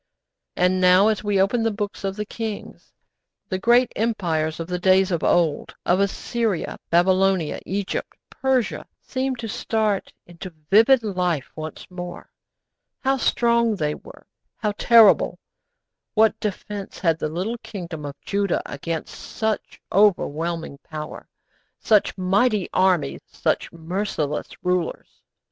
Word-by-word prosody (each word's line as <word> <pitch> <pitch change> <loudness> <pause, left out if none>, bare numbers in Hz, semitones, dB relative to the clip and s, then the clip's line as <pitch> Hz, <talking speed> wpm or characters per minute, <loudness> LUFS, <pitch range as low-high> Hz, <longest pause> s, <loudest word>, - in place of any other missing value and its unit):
And 180 +1 +2
now, 185 +3 +6
as 215 -1 -1
we 205 -2 +1
open 205 +5 +2
the 225 - +2
books 205 -2 -4
of 195 0 -2
the 210 0 -3
kings, 220 -1 -6 0.6
the 185 - -2
great 240 +4 +4
empires 170 -9 -1
of 165 - -3
the 180 +1 -3
days 190 +1 +4
of 170 - -1
old, 165 -4 +1
of 180 +2 +3
Assyria, 200 0 -1
Babylonia, 185 -1 +2
Egypt, 195 +1 -3
Persia, 260 -4 0 0.2
seem 260 0 -2
to 235 -2 -6
start 215 -1 -1
into 175 0 -10 0.2
vivid 230 +4 +6
life 180 -8 -1
once 155 0 -7
more. 180 -1 -8 0.7
How 270 0 +2
strong 235 -3 +2
they 150 -5 -1
were - - -13 0.3
how 210 - -1
terrible! 225 -2 +5 0.8
What 220 0 +4
defence 205 -1 -5
had 165 -3 +1
the 155 - -2
little 190 +9 -3
kingdom 180 -9 -7
of 145 -1 -7
Judah 200 -2 -1
against 160 +3 -5
such 220 -1 -4
overwhelming 170 -6 +1
power, 155 -1 -8 0.5
such 210 -2 +2
mighty 200 +2 +2
armies, 180 -7 +2
such - - -1
merciless 165 -3 -3 0.2
rulers? 180 -2 -2
190 Hz, 130 wpm, -23 LUFS, 170-220 Hz, 0.8 s, now